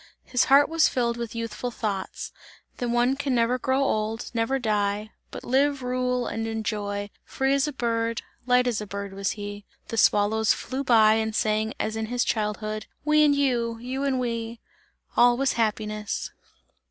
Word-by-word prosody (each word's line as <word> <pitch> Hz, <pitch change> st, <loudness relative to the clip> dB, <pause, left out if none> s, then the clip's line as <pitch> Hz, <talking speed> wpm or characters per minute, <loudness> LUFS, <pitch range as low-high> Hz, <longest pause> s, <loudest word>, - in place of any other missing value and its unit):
His 250 Hz, -1 st, +1 dB
heart 280 Hz, +2 st, +6 dB
was 325 Hz, -1 st, +3 dB
filled 235 Hz, -2 st, 0 dB
with 235 Hz, -1 st, -5 dB
youthful 230 Hz, +1 st, -3 dB
thoughts; 205 Hz, -5 st, -4 dB, 0.5 s
that 245 Hz, -, -2 dB
one 240 Hz, +2 st, +2 dB
can 275 Hz, -2 st, -1 dB
never 240 Hz, +2 st, +2 dB
grow 265 Hz, +2 st, +1 dB
old, 220 Hz, -2 st, -1 dB
never 230 Hz, +3 st, +1 dB
die; 210 Hz, -2 st, -1 dB, 0.2 s
but -, -, -8 dB
live, 275 Hz, +1 st, +1 dB
rule 250 Hz, 0 st, 0 dB
and 225 Hz, 0 st, -3 dB
enjoy; 205 Hz, -2 st, -3 dB
free 270 Hz, +1 st, 0 dB
as 280 Hz, +1 st, +2 dB
a -, -, -2 dB
bird, 230 Hz, -3 st, -1 dB, 0.2 s
light 250 Hz, 0 st, +4 dB
as 235 Hz, -4 st, 0 dB
a 210 Hz, -, -6 dB
bird 200 Hz, 0 st, -5 dB
was 195 Hz, 0 st, -1 dB
he. 205 Hz, 0 st, -6 dB, 0.3 s
The 230 Hz, -, -4 dB
swallows 215 Hz, +1 st, +4 dB
flew 265 Hz, +2 st, -4 dB
by 220 Hz, -4 st, +6 dB
and 220 Hz, -1 st, -1 dB
sang 215 Hz, +1 st, 0 dB
as 220 Hz, 0 st, -1 dB
in 220 Hz, 0 st, -2 dB
his 245 Hz, +1 st, 0 dB
childhood: 215 Hz, 0 st, -2 dB, 0.2 s
"We 305 Hz, 0 st, +5 dB
and 290 Hz, -1 st, +4 dB
you, 245 Hz, -5 st, +1 dB
and 230 Hz, +1 st, -12 dB
You 260 Hz, +2 st, -3 dB
and 270 Hz, -2 st, +1 dB
we!" 230 Hz, -1 st, -3 dB, 0.6 s
All 240 Hz, 0 st, +5 dB
was 270 Hz, +1 st, +1 dB
happiness. 215 Hz, -2 st, -2 dB
230 Hz, 180 wpm, -26 LUFS, 215-255 Hz, 0.6 s, heart